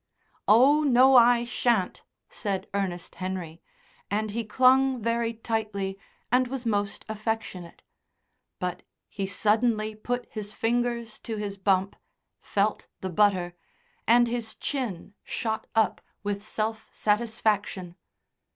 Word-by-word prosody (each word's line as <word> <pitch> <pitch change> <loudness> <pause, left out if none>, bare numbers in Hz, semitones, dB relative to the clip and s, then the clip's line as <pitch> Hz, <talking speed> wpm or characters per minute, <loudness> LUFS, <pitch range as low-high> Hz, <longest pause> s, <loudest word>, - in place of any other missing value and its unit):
"Oh, 265 +8 +6
no, 265 -2 +6
I 240 -1 +7
shan't," 235 -5 0 0.3
said 195 -2 -3
Ernest 185 -3 -3
Henry, 185 -3 -5 0.5
and 215 +1 -1
he 230 +2 -2
clung 260 +3 +4
very 230 +1 0
tightly 215 -4 -2 0.4
and 250 +1 +4
was 260 -1 -5
most 205 -3 -1
affectionate. 215 -5 -4 0.7
But 180 -1 -3 0.3
he 195 -1 -3
suddenly 215 +2 +1
put 245 +3 -3
his 210 -1 -5
fingers 235 -1 -1
to 225 -2 -5
his 205 -1 -3
bump, 190 0 +1 0.4
felt 205 +1 -1
the 190 - -3
butter, 185 -2 +2 0.5
and 240 +1 +6
his 230 -2 -3
chin 235 - -4
shot 220 -2 -3
up 220 -4 +2 0.2
with 205 0 -2
self 220 0 -3
satisfaction. 210 -4 0
215 Hz, 115 wpm, -27 LUFS, 200-235 Hz, 0.7 s, I